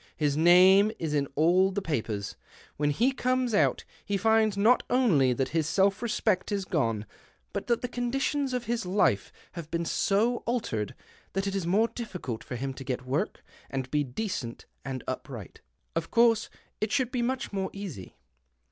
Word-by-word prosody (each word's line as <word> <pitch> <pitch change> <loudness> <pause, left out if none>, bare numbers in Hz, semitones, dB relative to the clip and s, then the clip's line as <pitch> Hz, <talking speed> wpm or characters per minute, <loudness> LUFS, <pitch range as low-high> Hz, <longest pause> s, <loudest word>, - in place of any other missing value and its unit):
His 145 -2 +1
name 185 +6 +6
is 160 -2 -3
in 140 -2 +1
all 175 +5 +4
the 200 - -1
papers. 110 - -3 0.4
When 145 0 +1
he 235 - +2
comes 255 -2 0
out 205 - +2 0.2
he 200 - -1
finds 220 0 +3
not 225 +5 +5
only 200 - +4
that 130 +1 0
his 160 -2 0
self 195 +2 +2
respect 215 -4 0
is 200 -2 -1
gone, 115 - 0 0.5
but - - -4
that 235 0 +1
the - - 0
conditions 265 +3 -1
of 250 -1 -2
his 235 0 -2
life 180 - +1 0.2
have 170 -3 -8
been 170 0 -2
so 215 +8 +1
altered 115 - -2 0.4
that 195 +1 -1
it 195 - -2
is 195 -4 -2
more 210 +6 +3
difficult 180 - -6
for 125 - -6
him 135 +2 -3
to 135 - -8
get 125 -1 -4
work 135 +4 -2 0.3
and 130 -1 -4
be 150 -1 +2
decent 135 - -4 0.2
and 130 -1 -5
upright. 125 -5 -6 0.3
Of 165 0 -2
course 230 -2 +3 0.3
it 215 0 -1
should 255 -2 +1
be 250 - -1
much 255 -1 -2
more 190 -1 -1
easy. 185 - -8
190 Hz, 175 wpm, -28 LUFS, 140-225 Hz, 0.5 s, name